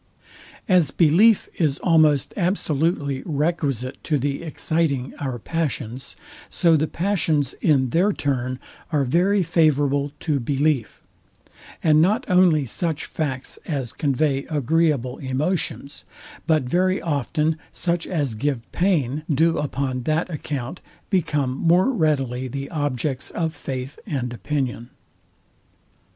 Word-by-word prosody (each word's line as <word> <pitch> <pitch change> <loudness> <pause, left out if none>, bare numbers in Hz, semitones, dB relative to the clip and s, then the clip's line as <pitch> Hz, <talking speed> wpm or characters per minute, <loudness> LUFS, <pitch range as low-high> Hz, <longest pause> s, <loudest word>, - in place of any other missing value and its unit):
As 180 -7 +4
belief 180 +9 +4
is 150 -5 +2
almost 155 -5 +3
absolutely 160 -6 0
requisite 145 -5 -2
to 150 - +1
the 140 +1 -2
exciting 155 -4 -1
our 130 -4 -3
passions, 135 -2 -3 0.3
so 170 -3 +3
the 155 +1 +1
passions 160 -7 0
in 135 -6 +3
their 185 +5 +3
turn 130 -6 -2 0.3
are 150 -3 +2
very 180 +9 +2
favourable 145 -4 +2
to 150 -4 0
belief; 140 0 -1 0.8
and 155 -1 +5
not 210 +9 +2
only 180 -6 +4
such 160 +6 -2
facts 135 -4 -4
as 135 -7 -3
convey 140 -1 0
agreeable 150 -3 +1
emotions, 140 +1 -2 0.4
but 155 -4 +3
very 185 +8 +1
often 155 +1 -1
such 170 -1 -1
as 145 -9 -1
give 130 +2 -1
pain, 155 -7 +1
do 165 +3 +2
upon 135 -3 -2
that 155 +7 -1
account 145 0 -5 0.3
become 145 -8 +1
more 175 - +3
readily 135 - 0
the 140 +2 -6
objects 145 -3 -2
of 160 -2 -2
faith 135 -2 -6
and 130 - -2
opinion. 120 0 -3
150 Hz, 115 wpm, -23 LUFS, 135-165 Hz, 0.8 s, and